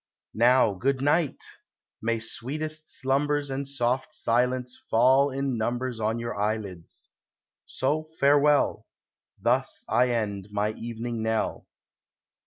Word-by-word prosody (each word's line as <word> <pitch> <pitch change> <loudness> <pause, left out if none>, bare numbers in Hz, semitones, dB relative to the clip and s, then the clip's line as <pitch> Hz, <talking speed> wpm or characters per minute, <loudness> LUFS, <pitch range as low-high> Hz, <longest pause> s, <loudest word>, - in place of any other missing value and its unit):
Now, 120 -1 +4
good 130 +8 0
night! 145 +2 +1 0.6
may 115 +1 0
sweetest 155 +7 -4
slumbers 145 +1 0
And 135 +1 -3
soft 130 -1 -1
silence 125 +1 0
fall 130 +5 +5
in 135 -3 -2
numbers 120 +1 -2
On 110 +1 0
your 120 +1 -4
eyelids. 100 -5 -4 0.6
So 150 +4 -1
farewell: 145 +1 +3 0.5
Thus - - +1
I 125 +2 +3
end 105 -5 -2
my 105 +1 0
evening 115 +1 -5
knell. 110 0 -1
125 Hz, 110 wpm, -26 LUFS, 110-140 Hz, 0.6 s, fall